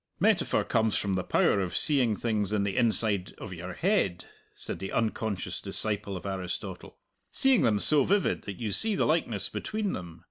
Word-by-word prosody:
"Metaphor - - +2
comes 110 -2 +1
from 100 -1 -1
the 95 -1 -1
power 100 - +2
of 90 -2 -1
seeing 130 -8 +3
things 105 -4 -1
in 105 -1 +1
the 100 -1 -2
inside 110 -5 +2
of 95 - -8
your 90 +1 -7
head," 130 - 0 0.3
said - - -6
the 95 - -5
unconscious 110 -3 -2
disciple 105 -2 +1
of 90 - -10
Aristotle 95 0 -5 0.3
"seeing 265 -3 +3
them 105 -3 +2
so 145 +5 +4
vivid 200 +5 +1
that 100 -2 -6
you 110 -3 -3
see 220 - +2
the - - +1
likeness 135 - 0
between 215 -2 -3
them. 85 -2 -7
105 Hz, 180 wpm, -28 LUFS, 95-125 Hz, 0.3 s, so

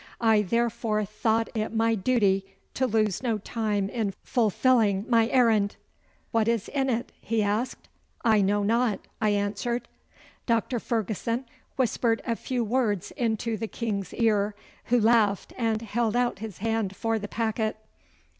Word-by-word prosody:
I 225 -2 +4
therefore 225 0 0
thought 220 +2 0
it 215 0 -1
my 225 +1 +3
duty 200 -3 +2 0.3
to 260 - +1
lose 215 -4 +1
no 235 -4 0
time 210 -1 -1
in 205 -2 -2
fulfilling 220 -3 +2
my 230 -2 +4
errand.' 225 -5 +3 0.6
'What 225 -2 +2
is 230 -2 0
in 270 -2 0
it?' 240 -1 -1
he 225 -2 0
asked. 215 +5 -2 0.4
'I 220 -2 +5
know 205 +1 +2
not,' 230 +1 +1 0.2
I 215 - +3
answered. 205 +4 -1 0.6
Doctor 230 +1 +1
Ferguson 230 +3 -2 0.3
whispered 235 -2 +1
a 230 - 0
few 245 +1 -2
words 220 -5 0
into 225 -1 -1
the 225 - -3
King's 210 -4 -3
ear, 210 -2 +2 0.3
who 245 0 +3
laughed 220 -3 +3
and 225 -2 0
held 225 +1 0
out 245 -3 +1
his 215 -3 -7
hand 220 -2 -1
for 225 +2 -1
the 205 - -5
packet. 220 0 -1
225 Hz, 145 wpm, -27 LUFS, 210-235 Hz, 0.6 s, I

